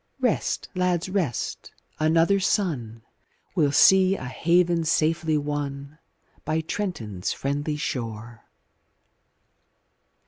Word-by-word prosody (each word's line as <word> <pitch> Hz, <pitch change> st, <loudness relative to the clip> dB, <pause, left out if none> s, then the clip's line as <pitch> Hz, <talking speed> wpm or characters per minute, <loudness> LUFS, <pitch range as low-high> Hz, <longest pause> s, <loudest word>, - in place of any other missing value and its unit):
Rest, -, -, 0 dB
lads, 180 Hz, -1 st, 0 dB
rest! 180 Hz, -, -2 dB, 0.3 s
another 165 Hz, +5 st, +3 dB
sun 140 Hz, -, -1 dB, 0.5 s
Will 150 Hz, -6 st, +2 dB
see 190 Hz, +5 st, +6 dB
a 130 Hz, -, -7 dB
haven 170 Hz, +6 st, +2 dB
safely 160 Hz, 0 st, +1 dB
won 145 Hz, 0 st, -4 dB, 0.4 s
By 160 Hz, +1 st, -1 dB
Trenton's 125 Hz, -, -4 dB
friendly 145 Hz, +2 st, -2 dB
shore. 115 Hz, -4 st, -5 dB
155 Hz, 90 wpm, -25 LUFS, 140-175 Hz, 0.5 s, see